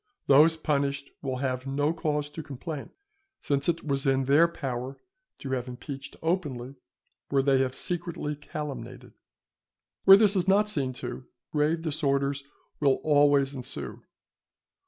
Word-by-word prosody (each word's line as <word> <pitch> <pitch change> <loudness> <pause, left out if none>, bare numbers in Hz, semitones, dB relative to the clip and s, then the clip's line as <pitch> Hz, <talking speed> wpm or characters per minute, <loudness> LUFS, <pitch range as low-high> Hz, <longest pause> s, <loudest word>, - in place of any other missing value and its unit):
Those 155 +4 +6
punished 140 -2 -1
will 130 -2 -2
have 130 0 -2
no 145 +3 0
cause 150 -3 -2
to 160 - -6
complain, 145 +1 -7 0.5
since 140 +2 0
it 170 0 -1
was 140 -1 0
in 135 0 +3
their 145 +6 +5
power 130 -4 -5 0.4
to 135 - -7
have 130 -1 -2
impeached 135 +2 -8
openly 145 -7 -2 0.6
where 135 -1 +2
they 135 -1 +3
have 130 -1 0
secretly 170 -4 -2
calumniated. 150 -1 -7 0.9
Where 195 0 +10
this 205 -1 +4
is 185 -1 +1
not 205 +2 +4
seen 135 -7 -1
to, 125 +1 -6 0.2
grave 155 +2 +1
disorders 140 -3 0 0.4
will 140 -3 +4
always 145 -2 +4
ensue. 130 -3 -5
140 Hz, 135 wpm, -27 LUFS, 135-155 Hz, 0.9 s, Where